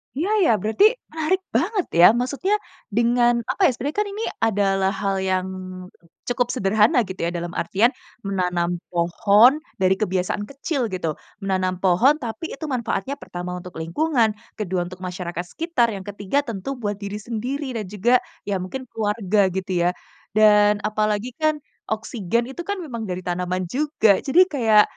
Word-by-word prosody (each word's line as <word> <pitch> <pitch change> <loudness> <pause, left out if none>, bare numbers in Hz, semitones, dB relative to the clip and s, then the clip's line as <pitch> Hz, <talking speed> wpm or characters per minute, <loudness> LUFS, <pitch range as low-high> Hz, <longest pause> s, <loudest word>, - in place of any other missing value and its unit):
Iya 330 +8 -1 0.2
ya, - - +5
berarti, 220 - +3 0.3
menarik 320 +4 0
banget 410 -4 +1
ya 175 - +10
maksudnya 280 +11 -1 0.4
dengan 240 +1 +4 0.2
apa - - -6
ya, - - +6
sebenarnya 280 - -4
kan 415 - -2
ini 430 +2 -4 0.3
adalah 195 -2 +1
hal 195 -1 0
yang 185 0 0 0.8
cukup 245 0 +1
sederhana 210 +3 +3
gitu 185 +1 -8
ya, - - -2
dalam 175 0 -4
artian 205 +8 +2 0.4
menanam 180 -3 0 0.2
pohon, 200 +7 +5 0.3
dari 185 0 +5
kebiasaan 190 0 -1
kecil 280 +1 -3
gitu. 165 -4 -1 0.3
Menanam 185 -1 0
pohon 195 +10 +5
tapi 240 +9 -5
itu 315 - -6
manfaatnya 250 -2 -2
pertama 180 0 -6
untuk 180 0 -10
lingkungan, 240 - +1 0.3
kedua 185 -4 -1
untuk 185 0 -11
masyarakat 180 -1 -4
sekitar, 330 -8 +1
yang 195 - -7
ketiga 205 +6 -1
tentu 230 -3 -5
buat 205 -1 -1
diri 200 0 -5
sendiri 255 +4 -3
dan 215 - -3
juga, 210 +5 +1 0.3
ya 200 - 0
mungkin 260 +8 -5
keluarga 210 -2 0 0.2
gitu 190 +1 -3 0.2
ya. - - +4 0.5
Dan, 210 -1 +5
apalagi 215 +2 0
kan, 310 0 +3 0.3
oksigen 220 0 -1
itu 310 - -6
kan 405 - -1
memang 235 -8 -5
dari 185 0 -4
tanaman 180 +1 -2
juga 260 -8 +3
jadi 310 +6 +4
kayak, 220 -7 +5
215 Hz, 155 wpm, -23 LUFS, 185-255 Hz, 0.8 s, ya